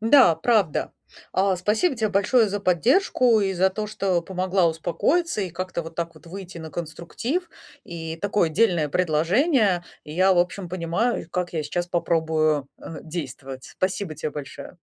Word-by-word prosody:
Да, 225 - +6
правда. 195 -2 +1 0.4
А, 190 0 +2
спасибо 215 - +1
тебе 220 -2 0
большое 210 +3 +3
за 205 0 -3
поддержку 235 - +3
и 195 -1 0
за 190 +2 +3
то, 210 +2 -4
что 195 -4 0
помогла 185 0 +1
успокоиться 180 - 0
и 190 -3 -2
как-то 185 0 -4
вот 165 0 -10
так 170 0 -3
вот 155 - -18
выйти 185 0 -8
на 160 -1 -8
конструктив. 175 - -4 0.4
И 165 -4 -6
такое 200 -1 +1
дельное 170 -4 +2
предложение. 180 - +2 0.2
И 150 - -9
я, 185 +3 +4
в - - +2
общем, 180 +1 0
понимаю, 175 +5 -1
как 180 0 -2
я 160 -2 -1
сейчас 175 +4 -2
попробую, 160 -4 +1
э, 165 - -8
действовать. 135 -5 -7
Спасибо 185 -2 -3
те 155 +1 -4
большое. 145 +4 -8
180 Hz, 160 wpm, -24 LUFS, 165-205 Hz, 0.4 s, Да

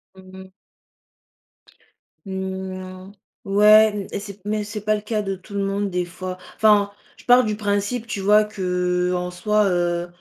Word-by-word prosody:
Mmh 190 0 -15
mh. 190 - -18 1.7
Mmh. 190 0 -6 0.3
Ouais, 210 +2 +6
m 205 -2 -5
et - - -2
c'est 200 -1 -9
mais 210 0 -1
c'est 210 +1 -6
pas 215 0 +3
le 210 - -4
cas 215 0 -2
de 195 -1 -3
tout 190 +3 -15
le 200 - 0
monde 200 +1 -1
des 180 -1 -1
fois, 185 +1 -7 0.2
enfin, 210 -2 +4 0.3
je - - -18
pars 250 +1 +6
du 215 -2 -2
principe, 205 +3 -2
tu 205 -3 -4
vois, 210 +2 +5
qu'en 180 -2 -1
soi, 210 +4 +1
heu 175 -1 0
200 Hz, 165 wpm, -22 LUFS, 185-210 Hz, 1.7 s, Ouais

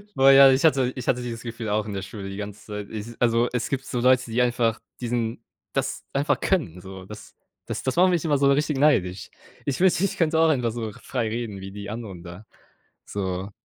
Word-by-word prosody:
Boah 135 +1 +7
ja, 135 0 +9
ich 130 +1 +2
hatte 135 -5 +3
ich 125 - -6
hatte 125 - +2
dieses 120 -1 -5
Gefühl 115 -2 -5
auch 105 0 0
in 105 - -5
der 95 - -3
Schule 95 0 -7
die 95 - -7
ganze 105 0 -7
Zeit. 105 -1 -6
I 110 +2 -7
also, 120 0 +3
es 125 -2 -2
gibt 135 -1 -2
so 125 - -3
Leute, 130 +1 +4
die 120 +2 +2
einfach 120 -2 +1 0.2
diesen 115 -1 -2 0.3
das - - -2
einfach 140 +3 +1
können, 90 - -1
so 95 0 -10
das 105 +2 -12 0.3
das - - -4
das 130 - -1
macht 185 +2 +5
mich 175 -3 +1
immer 145 -3 +2
so 140 0 +4
richtig 145 +1 +1
neidisch. 95 - +2 0.4
Ich 135 -2 -1
wünschte, 185 -1 +3
ich 195 - -1
könnte 160 -1 +2
auch 165 0 +5
einfach 125 -6 +1
so 110 -1 -4
frei 120 +1 -3
reden 110 -3 -4
wie 95 0 -7
die 100 0 -7
anderen 105 -6 -7
da 90 +4 -10 0.6
so. 95 -1 -4
120 Hz, 225 wpm, -24 LUFS, 105-135 Hz, 0.6 s, ja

